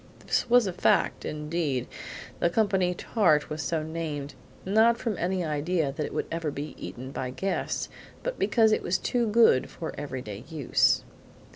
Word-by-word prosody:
This -, -, 0 dB
was 245 Hz, -1 st, +6 dB
a 190 Hz, -, -2 dB
fact; 180 Hz, -, +2 dB
indeed, 150 Hz, -4 st, -2 dB, 0.5 s
the 170 Hz, -, +3 dB
company 190 Hz, -2 st, +2 dB
tart 175 Hz, -9 st, +2 dB
was 155 Hz, +1 st, -3 dB
so 160 Hz, -1 st, -1 dB
named, 155 Hz, -3 st, -4 dB, 0.3 s
not 220 Hz, +4 st, +4 dB
from 225 Hz, -4 st, -2 dB
any 180 Hz, 0 st, 0 dB
idea 155 Hz, 0 st, 0 dB
that 145 Hz, +2 st, -3 dB
it -, -, -9 dB
would -, -, -2 dB
ever 165 Hz, -2 st, -1 dB
be 145 Hz, +1 st, -5 dB
eaten 120 Hz, +9 st, -7 dB
by 130 Hz, -2 st, -3 dB
guests, 190 Hz, +10 st, -2 dB, 0.4 s
but -, -, -3 dB
because 220 Hz, -2 st, +4 dB
it -, -, +2 dB
was 185 Hz, -, +1 dB
too 240 Hz, +2 st, 0 dB
good 215 Hz, -, +4 dB
for 165 Hz, -, -6 dB
every 130 Hz, -3 st, -5 dB
day 105 Hz, +1 st, -7 dB
use. 155 Hz, -6 st, +2 dB
165 Hz, 170 wpm, -27 LUFS, 145-195 Hz, 0.5 s, was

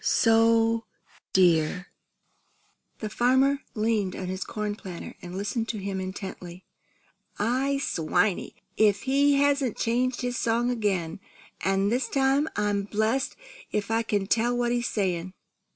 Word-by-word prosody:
So 225 Hz, 0 st, +3 dB, 0.5 s
dear!" 180 Hz, -1 st, +3 dB, 1.2 s
The 215 Hz, -, -3 dB
farmer 260 Hz, +3 st, +3 dB, 0.2 s
leaned 215 Hz, -3 st, 0 dB
on 185 Hz, -1 st, -5 dB
his 185 Hz, +1 st, -3 dB
corn 210 Hz, -1 st, -3 dB
planter 185 Hz, -5 st, -8 dB
and 180 Hz, +1 st, -7 dB
listened 215 Hz, +3 st, -2 dB
to 220 Hz, -, -2 dB
him 195 Hz, -1 st, -3 dB
intently. 185 Hz, -1 st, -7 dB, 0.7 s
"I 260 Hz, +6 st, +1 dB
swanny! 190 Hz, -, 0 dB, 0.2 s
If 205 Hz, -2 st, +3 dB
he 280 Hz, +2 st, +3 dB
hasn't 280 Hz, -4 st, +2 dB
changed 245 Hz, +2 st, 0 dB
his 245 Hz, -1 st, -2 dB
song 235 Hz, +2 st, +1 dB
again, 195 Hz, -6 st, -1 dB, 0.4 s
an' 195 Hz, +1 st, +2 dB
this 245 Hz, +4 st, 0 dB
time 275 Hz, +2 st, +2 dB
I'm 205 Hz, -1 st, +1 dB
blest 220 Hz, +6 st, 0 dB, 0.4 s
if 210 Hz, +1 st, -2 dB
I 225 Hz, 0 st, +2 dB
can 205 Hz, -3 st, -1 dB
tell 235 Hz, +4 st, +1 dB
what 240 Hz, -1 st, +1 dB
he's 240 Hz, -1 st, 0 dB
saying!" 185 Hz, -3 st, -1 dB
220 Hz, 135 wpm, -26 LUFS, 195-245 Hz, 1.2 s, So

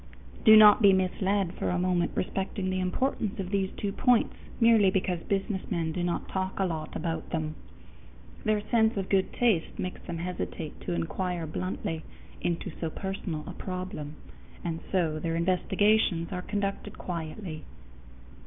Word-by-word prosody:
Do 220 Hz, -2 st, +10 dB
not 210 Hz, +1 st, +9 dB
be 200 Hz, -2 st, +7 dB
misled 190 Hz, 0 st, +1 dB
for -, -, -2 dB
a 180 Hz, -, +1 dB
moment 180 Hz, -1 st, +1 dB
respecting 190 Hz, 0 st, -2 dB
the 185 Hz, -, -1 dB
importance 210 Hz, +2 st, -1 dB
of 185 Hz, -1 st, -3 dB
these 195 Hz, -2 st, +1 dB
two 205 Hz, -, -2 dB
points 245 Hz, +2 st, +3 dB, 0.3 s
merely 230 Hz, -4 st, +6 dB
because 185 Hz, -2 st, 0 dB
businessmen 190 Hz, -3 st, -2 dB
do 180 Hz, -, -3 dB
not 175 Hz, -1 st, -1 dB
talk 190 Hz, 0 st, -3 dB
a 195 Hz, -, +3 dB
lot 160 Hz, -3 st, -4 dB
about 165 Hz, -2 st, -3 dB
them. 155 Hz, -2 st, -2 dB, 0.9 s
Their 215 Hz, -1 st, +2 dB
sense 220 Hz, -2 st, +4 dB
of 195 Hz, -1 st, -2 dB
good 190 Hz, -1 st, +2 dB
taste 220 Hz, -9 st, +1 dB
makes 185 Hz, -, -4 dB
them 170 Hz, -2 st, -5 dB
hesitate 170 Hz, -2 st, -5 dB
to -, -, -3 dB
inquire 170 Hz, -, -2 dB
bluntly 165 Hz, 0 st, -3 dB, 0.4 s
into 175 Hz, +2 st, -2 dB
so 165 Hz, -, 0 dB
personal 185 Hz, -3 st, -4 dB
a -, -, -7 dB
problem, 180 Hz, -5 st, -5 dB, 0.5 s
and 165 Hz, -1 st, -2 dB
so 165 Hz, -5 st, +1 dB
their 165 Hz, +1 st, -1 dB
investigations 185 Hz, +1 st, +2 dB
are 180 Hz, -1 st, -3 dB
conducted 200 Hz, +1 st, -3 dB
quietly. 165 Hz, -1 st, -5 dB
185 Hz, 155 wpm, -28 LUFS, 170-200 Hz, 0.9 s, Do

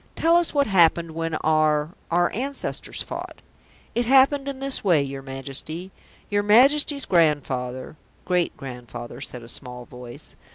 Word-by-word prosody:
"Tell 335 Hz, +1 st, +3 dB
us 345 Hz, -1 st, +3 dB
what 285 Hz, -1 st, +2 dB
happened 170 Hz, -3 st, +3 dB
when 165 Hz, 0 st, -3 dB
our 155 Hz, 0 st, +2 dB, 0.2 s
our 175 Hz, +1 st, +2 dB
ancestors 270 Hz, +6 st, -3 dB
fought." -, -, -8 dB, 0.5 s
"It 240 Hz, +1 st, 0 dB
happened 275 Hz, +2 st, +4 dB
in 275 Hz, -1 st, -4 dB
this 275 Hz, 0 st, 0 dB
way, 170 Hz, -8 st, +3 dB
your 135 Hz, 0 st, -6 dB
Majesty. 140 Hz, +7 st, -4 dB, 0.4 s
Your 205 Hz, 0 st, +1 dB
Majesty's 275 Hz, +7 st, +4 dB
grandfather 140 Hz, -5 st, 0 dB
" -, -, -34 dB
"Great 180 Hz, -2 st, 0 dB
grandfather," 125 Hz, -2 st, -8 dB
said 125 Hz, -2 st, -7 dB
a -, -, -11 dB
small 125 Hz, 0 st, -2 dB
voice. 125 Hz, -1 st, -11 dB
165 Hz, 150 wpm, -24 LUFS, -, 0.5 s, happened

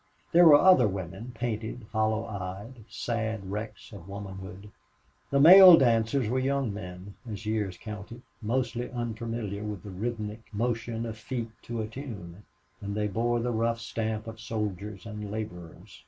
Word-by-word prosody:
There 175 Hz, 0 st, +7 dB
were 150 Hz, -, +10 dB
other 165 Hz, -, +6 dB
women 95 Hz, +5 st, -5 dB
painted, 115 Hz, 0 st, -4 dB
hollow 110 Hz, 0 st, +1 dB
eyed 100 Hz, +4 st, -7 dB
sad 110 Hz, -4 st, -3 dB
wrecks 105 Hz, +2 st, -6 dB
of 95 Hz, -3 st, -10 dB
womanhood. 100 Hz, 0 st, -8 dB, 0.6 s
The 140 Hz, -, +2 dB
male 180 Hz, +3 st, +11 dB
dancers 120 Hz, 0 st, +2 dB
were 130 Hz, +4 st, 0 dB
young 135 Hz, -4 st, 0 dB
men, 90 Hz, -1 st, -8 dB, 0.2 s
as 105 Hz, +1 st, -6 dB
years 105 Hz, -4 st, -1 dB
counted, 110 Hz, +3 st, -8 dB, 0.2 s
mostly 120 Hz, +1 st, -1 dB
unfamiliar 115 Hz, -3 st, -4 dB
with 105 Hz, -4 st, -5 dB
the 100 Hz, -, -8 dB
rhythmic 110 Hz, +2 st, -5 dB
motion 115 Hz, +1 st, -2 dB
of 110 Hz, -1 st, -6 dB
feet 115 Hz, 0 st, -4 dB
to 115 Hz, -1 st, -3 dB
a -, -, -4 dB
tune, 105 Hz, -7 st, -8 dB, 0.4 s
and 100 Hz, 0 st, -4 dB
they 105 Hz, 0 st, 0 dB
bore 120 Hz, +4 st, 0 dB
the 120 Hz, +1 st, -1 dB
rough 115 Hz, 0 st, 0 dB
stamp 110 Hz, -1 st, -3 dB
of 115 Hz, 0 st, -8 dB
soldiers 105 Hz, -3 st, -4 dB
and 105 Hz, -2 st, -6 dB
laborers. 100 Hz, -6 st, -7 dB
110 Hz, 155 wpm, -28 LUFS, 105-120 Hz, 0.6 s, male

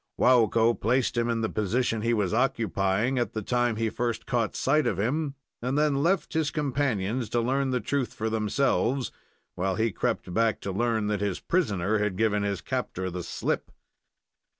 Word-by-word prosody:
Waukko 115 Hz, -2 st, +4 dB
placed 125 Hz, +3 st, +1 dB
him 120 Hz, 0 st, +1 dB
in 115 Hz, -1 st, 0 dB
the 110 Hz, -, +1 dB
position 110 Hz, +2 st, 0 dB
he 115 Hz, +2 st, +1 dB
was 105 Hz, -4 st, +1 dB
occupying 115 Hz, -1 st, +1 dB
at 120 Hz, -4 st, -1 dB
the 110 Hz, -, -3 dB
time 120 Hz, +1 st, +1 dB
he 110 Hz, 0 st, -1 dB
first 120 Hz, -1 st, -2 dB
caught 115 Hz, -3 st, 0 dB
sight 150 Hz, 0 st, +2 dB
of 105 Hz, -7 st, 0 dB
him, 140 Hz, +7 st, -1 dB, 0.3 s
and 130 Hz, +4 st, -1 dB
then 150 Hz, -2 st, +2 dB
left 175 Hz, +4 st, +1 dB
his 160 Hz, -2 st, +1 dB
companions 130 Hz, -6 st, -1 dB
to 120 Hz, -, +1 dB
learn 135 Hz, +3 st, +1 dB
the 125 Hz, -1 st, +1 dB
truth 130 Hz, +3 st, -1 dB
for 110 Hz, -, -3 dB
themselves, 120 Hz, +4 st, +1 dB, 0.4 s
while 95 Hz, +1 st, -1 dB
he 115 Hz, +1 st, +1 dB
crept 90 Hz, -, -2 dB
back 115 Hz, 0 st, +2 dB
to 100 Hz, -, -3 dB
learn 110 Hz, +2 st, 0 dB
that 105 Hz, -1 st, -1 dB
his 100 Hz, -3 st, -1 dB
prisoner 105 Hz, -, 0 dB
had 105 Hz, -3 st, -1 dB
given 105 Hz, -1 st, +2 dB
his 100 Hz, -2 st, -2 dB
captor 95 Hz, 0 st, -3 dB
the 90 Hz, +1 st, -4 dB
slip. 85 Hz, -, -3 dB
115 Hz, 180 wpm, -27 LUFS, 105-130 Hz, 0.4 s, Waukko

